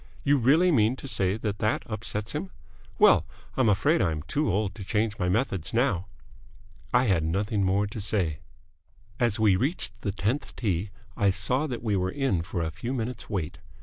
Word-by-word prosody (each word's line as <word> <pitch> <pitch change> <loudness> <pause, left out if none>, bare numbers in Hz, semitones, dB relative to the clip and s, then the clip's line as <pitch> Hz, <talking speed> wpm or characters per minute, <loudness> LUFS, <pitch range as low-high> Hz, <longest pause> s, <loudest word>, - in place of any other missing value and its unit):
"You 145 0 +3
really 155 +9 +4
mean 115 -3 +3
to 140 - -9
say 95 -5 +1
that 105 -2 -3
that 110 +1 0
upsets 110 -1 -4
him? 165 +6 -4 0.5
Well, - - +5 0.3
I'm 130 -4 +3
afraid 145 - +3
I 85 - +2
am 75 -2 -4
too 145 - 0
old 100 0 0
to 105 - -8
change 105 +2 -1
my 90 -2 0
methods 95 - -1
now." 105 -7 +1 0.8
I 125 +1 +4
had 95 -9 +2
nothing 100 +5 0
more 95 +2 +2
to 105 +1 -6
say. 90 -7 0 0.8
As 120 -2 +1
we 105 -3 +5
reached 140 - -1
the 100 - -1
tenth 105 +9 -2
tee, 100 -3 -1 0.3
I 100 - +3
saw 115 +10 0
that 125 -4 -5
we 105 -3 +1
were 95 -1 0
in 130 -6 0
for 85 0 -3
a 80 - -2
few 120 +10 -4
minutes' 120 -1 -4
wait. 90 -5 -3
105 Hz, 190 wpm, -27 LUFS, 95-125 Hz, 0.8 s, Well